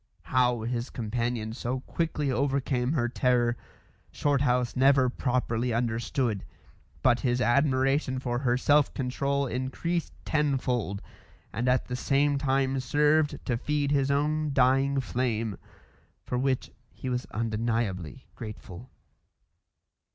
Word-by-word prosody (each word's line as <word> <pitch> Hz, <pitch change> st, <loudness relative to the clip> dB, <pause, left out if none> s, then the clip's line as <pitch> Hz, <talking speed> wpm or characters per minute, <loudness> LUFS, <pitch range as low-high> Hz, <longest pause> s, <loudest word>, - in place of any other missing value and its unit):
How 125 Hz, -2 st, +2 dB
his 120 Hz, +2 st, -3 dB
companion 115 Hz, -1 st, -2 dB
so 125 Hz, +1 st, -3 dB
quickly 150 Hz, -2 st, -2 dB
overcame 135 Hz, -1 st, 0 dB
her 120 Hz, -6 st, +1 dB
terror, 120 Hz, -1 st, +2 dB, 0.6 s
Shorthouse 130 Hz, -4 st, +1 dB
never 135 Hz, 0 st, +4 dB
properly 125 Hz, -2 st, -1 dB
understood; 115 Hz, -2 st, -1 dB, 0.6 s
but 125 Hz, -2 st, +4 dB
his 125 Hz, -1 st, 0 dB
admiration 130 Hz, +1 st, +2 dB
for 120 Hz, -2 st, -2 dB
her 125 Hz, -2 st, +1 dB
self 145 Hz, +2 st, +3 dB
control 140 Hz, +2 st, -1 dB
increased 135 Hz, +7 st, -2 dB
tenfold, 125 Hz, -, 0 dB, 0.5 s
and 120 Hz, +4 st, 0 dB
at 125 Hz, 0 st, +2 dB
the 125 Hz, -, -4 dB
same 140 Hz, +2 st, +2 dB
time 135 Hz, -1 st, +1 dB
served 150 Hz, +3 st, +2 dB
to 120 Hz, -3 st, 0 dB
feed 145 Hz, +2 st, -1 dB
his 140 Hz, -1 st, +2 dB
own 150 Hz, +1 st, +1 dB
dying 135 Hz, +1 st, +3 dB
flame 115 Hz, -5 st, -2 dB, 0.7 s
for -, -, -3 dB
which 130 Hz, -1 st, 0 dB, 0.2 s
he -, -, -8 dB
was 125 Hz, -1 st, -2 dB
undeniably 110 Hz, -, -2 dB
grateful. 105 Hz, 0 st, -9 dB
130 Hz, 115 wpm, -28 LUFS, 120-140 Hz, 0.7 s, never